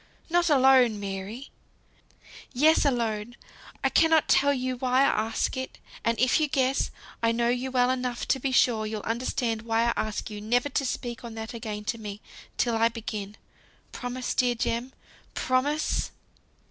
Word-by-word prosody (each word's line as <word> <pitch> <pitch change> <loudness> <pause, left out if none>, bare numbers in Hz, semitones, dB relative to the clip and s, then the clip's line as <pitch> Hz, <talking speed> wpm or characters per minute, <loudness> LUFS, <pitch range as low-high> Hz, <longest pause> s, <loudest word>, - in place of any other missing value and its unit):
"Not 345 0 +3
alone, 260 -6 +5
Mary!" 200 +6 -6 1.0
"Yes, 305 +5 +4
alone! 235 -3 -1 0.5
I - - +3
cannot 320 -1 +4
tell 285 +1 +4
you 255 -2 -1
why 255 +1 +2
I 220 -5 +2
ask 225 - -1
it. 260 0 -5 0.3
And 230 0 0
if 255 +4 +3
you 310 - +2
guess, 270 -2 +1 0.3
I 230 0 +3
know 235 +1 +1
you 250 +2 -1
well 250 -1 +2
enough 250 -2 -3
to 265 - +2
be 265 +1 -1
sure 225 -4 +3
you'll 215 -1 -4
understand 230 -1 -1
why 225 0 +1
I 235 0 +2
ask 215 0 -3
you 210 -1 -6
never 245 +6 +1
to 280 - -1
speak 240 -1 -4
on 230 -2 -8
that 220 +1 -6
again 215 -2 -5
to 230 +2 -3
me, 205 -1 -7 0.4
till 235 -2 +1
I 225 +1 +3
begin. 215 -3 -6 0.5
Promise, 250 0 -4
dear 245 -1 +2
Jem, 235 +2 -2 0.4
promise!" 285 +4 0
245 Hz, 165 wpm, -27 LUFS, 225-260 Hz, 1.0 s, alone